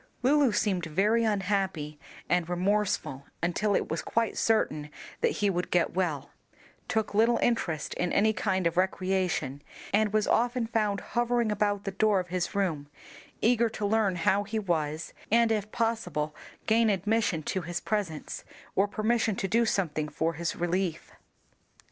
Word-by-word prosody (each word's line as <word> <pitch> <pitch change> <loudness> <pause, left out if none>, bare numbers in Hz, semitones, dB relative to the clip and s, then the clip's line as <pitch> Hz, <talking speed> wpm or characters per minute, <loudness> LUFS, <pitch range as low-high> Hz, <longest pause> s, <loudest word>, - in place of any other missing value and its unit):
Lulu 280 -1 +4
seemed 190 -5 0
very 210 +8 +2
unhappy 190 -8 -1 0.3
and 175 -1 +1
remorseful 180 -6 0 0.2
until 195 +4 +1
it - - 0
was 160 - -1
quite 230 -1 -1
certain 155 -9 +1 0.3
that - - +3
he 205 - +1
would 180 -1 -2
get 175 -1 +1
well, 175 -7 -1 0.6
took 220 -1 -1
little 230 +3 +4
interest 170 -10 0
in 180 - -1
any 220 +2 +3
kind 190 -4 0
of 170 +1 0
recreation, 185 -7 0 0.3
and 210 0 +3
was 215 0 +2
often 245 0 +1
found 215 -3 0
hovering 240 -2 +1
about 205 -1 0
the 195 - -3
door 205 0 +2
of 180 -1 -5
his 180 +2 -2
room, 165 -8 -1 0.6
eager 235 0 +4
to 215 -1 -4
learn 205 -2 +2
how 190 +4 +2
he 215 +2 -4
was 160 -6 -2 0.2
and 230 +1 +4
if 210 -1 -1
possible 180 -10 -1 0.3
gain 225 0 +4
admission 200 -3 +1
to 190 - -2
his 175 +1 -4
presence, 195 -8 -3 0.3
or 195 +2 +3
permission 220 0 0
to 195 - -2
do 230 +4 +2
something 155 -7 -1
for 160 +3 -1
his 165 +2 -3
relief. 175 -1 -2
200 Hz, 155 wpm, -28 LUFS, 175-220 Hz, 0.6 s, Lulu